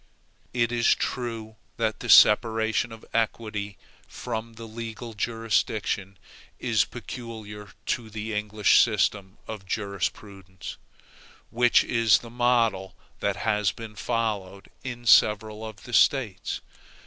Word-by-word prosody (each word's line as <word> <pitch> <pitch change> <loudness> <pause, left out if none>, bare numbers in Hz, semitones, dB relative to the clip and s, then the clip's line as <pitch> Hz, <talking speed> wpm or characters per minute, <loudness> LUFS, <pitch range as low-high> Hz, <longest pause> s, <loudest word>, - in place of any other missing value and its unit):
It 120 -1 +1
is 120 -1 +3
true 115 -3 -4 0.2
that 110 -2 -1
the - - -6
separation 110 +1 +5
of 115 0 -10
the - - -16
equity 105 -3 -2 0.3
from 115 -1 -5
the 115 +1 -9
legal 115 +1 -7
jurisdiction 110 -3 -1 0.4
is - - +2
peculiar 105 -4 -8
to 115 -3 -2
the 110 +1 -5
English 105 0 +3
system 100 -3 0
of 105 -3 -7
jurisprudence: 100 -2 -5 0.7
which 120 +1 +4
is 115 -3 +4
the 115 - -11
model 115 -6 +1 0.2
that - - 0
has 105 -2 +1
been 115 -2 -9
followed 105 -4 -3
in 120 -2 -6
several 110 -1 +4
of 110 -1 -9
the 120 - -10
States. 115 -6 +2
110 Hz, 120 wpm, -26 LUFS, 105-115 Hz, 0.7 s, separation